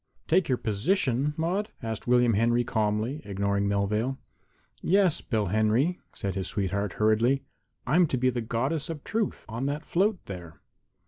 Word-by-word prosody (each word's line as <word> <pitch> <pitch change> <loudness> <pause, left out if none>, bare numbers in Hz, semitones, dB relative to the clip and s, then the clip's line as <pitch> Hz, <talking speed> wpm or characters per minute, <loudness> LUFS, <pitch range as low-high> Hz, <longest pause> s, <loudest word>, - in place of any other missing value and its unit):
"Take 170 -1 +3
your 130 - +2
position, 130 - 0
Maude?" 180 +6 -1
asked 110 0 -4
William 125 -1 +4
Henry 120 +3 +3
calmly, 110 +4 -1
ignoring 100 0 0
Melvale. 105 +6 0 0.6
"Yes, 190 -3 +3
Bill 110 -3 -1
Henry," 110 - +2
said 100 -1 -4
his 95 -2 -2
sweetheart, 100 -1 -1
hurriedly; 115 +6 +2 0.4
"I'm 165 +6 +4
to 130 - -1
be 130 +1 +2
the 120 -1 -2
Goddess 135 +8 -1
of 155 -3 -5
Truth 225 -2 -2
on 120 +4 -3
that 145 +1 -3
float 195 +3 +2
there." 85 -5 -8
120 Hz, 150 wpm, -27 LUFS, 105-150 Hz, 0.6 s, William